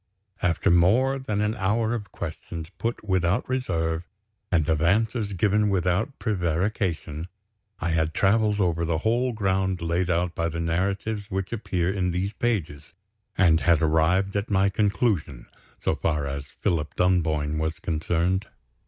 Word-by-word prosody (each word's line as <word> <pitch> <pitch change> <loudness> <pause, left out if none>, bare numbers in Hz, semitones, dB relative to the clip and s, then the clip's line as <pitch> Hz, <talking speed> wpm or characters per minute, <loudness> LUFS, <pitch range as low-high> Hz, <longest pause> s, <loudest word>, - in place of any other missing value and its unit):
After 90 +2 +2
more 115 +11 +4
than 105 -6 -2
an 105 +1 +1
hour 110 +3 +1
of 105 -5 -5
questions 80 +1 -6
put 115 +3 -2
without 95 -1 +1
reserve, 85 -11 -1 0.5
and 80 -5 +2
of 80 -1 +1
answers 105 +4 +1
given 105 +3 +2
without 95 - 0
prevarication, 90 -4 -1 0.5
I 85 - -1
had 80 -1 0
traveled 105 +1 +3
over 85 -3 +1
the 80 -1 0
whole 120 +7 +1
ground 95 -4 0
laid 85 +2 0
out 85 0 +1
by 85 0 -1
the 85 +1 -4
narratives 100 +5 -1
which 95 +2 -3
appear 95 -5 -1
in 95 -2 0
these 90 +4 -2
pages, 85 -11 -2 0.4
and 85 -4 +5
had 80 -1 +3
arrived 80 +5 +2
at 100 +2 -1
my 100 -1 +3
conclusion 100 - 0 0.4
so - - +2
far 75 -3 -1
as 70 0 -4
Philip 75 0 -2
Dunboyne 80 -4 +1
was 80 0 -1
concerned. 90 +4 -1
90 Hz, 145 wpm, -25 LUFS, 80-105 Hz, 0.5 s, and